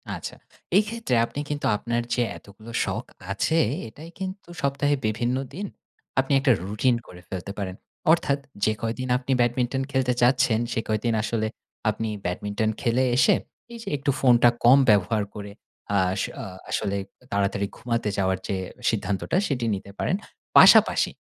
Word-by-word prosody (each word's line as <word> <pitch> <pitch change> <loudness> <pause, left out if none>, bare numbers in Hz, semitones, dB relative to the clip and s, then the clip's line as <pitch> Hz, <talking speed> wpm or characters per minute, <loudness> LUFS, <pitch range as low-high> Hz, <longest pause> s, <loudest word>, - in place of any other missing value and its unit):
আচ্ছা। - - -7 0.4
এই 210 - +5
ক্ষেত্রে 230 - -1
আপনি 140 - -7
কিন্তু 145 0 -3
আপনার 120 +3 -1
যে 125 - +1 0.2
এতগুলো 110 +3 -13
শখ - - -3 0.3
আছে, 100 +12 +1 0.3
এটাই 155 +9 -11
কিন্তু 190 -1 -6
সপ্তাহে 140 +1 +1
বিভিন্ন 120 +4 0 0.2
দিন 195 +7 -4 0.5
আপনি 135 +1 +1
একটা 135 -1 +3
রুটিন 110 +5 +1
করে 90 -1 -12
ফেলতে 95 +1 -5
পারেন। 95 -2 -4 0.4
অর্থাৎ 150 -4 +2 0.3
যে 110 - +3
কয়দিন 115 +3 -2
আপনি 130 +1 -4
ব্যাডমিন্টন 125 +2 +1
খেলতে 130 -2 +1
চাচ্ছেন, 125 -2 +4
সে - - 0
কয়দিন 110 +2 0
আসলে 110 -1 -1 0.4
আপনি 110 +1 -2 0.2
ব্যাডমিন্টন 105 +4 -1
খেলে 120 +2 +2
এসে 125 - +5 0.4
এইযে 230 -3 -7
একটু 140 +1 0
ফোনটা 120 -2 +6 0.2
কম 125 +3 +8
ব্যবহার 105 +1 +3
করে, 105 -1 -7 0.5
আস 95 +1 +1 0.2
আ - - -5 0.2
আসলে 100 0 -1 0.3
তাড়াতাড়ি 100 0 0
ঘুমাতে 115 -2 -1
যাওয়ার 95 -1 +1
যে 100 - -1 0.3
সিদ্ধান্তটা 100 - -1
সেটি 125 -4 -1
নিতে 100 +1 -9
পারেন। 185 - +1 0.4
পাশাপাশি - - +7
120 Hz, 150 wpm, -25 LUFS, 105-135 Hz, 0.5 s, কম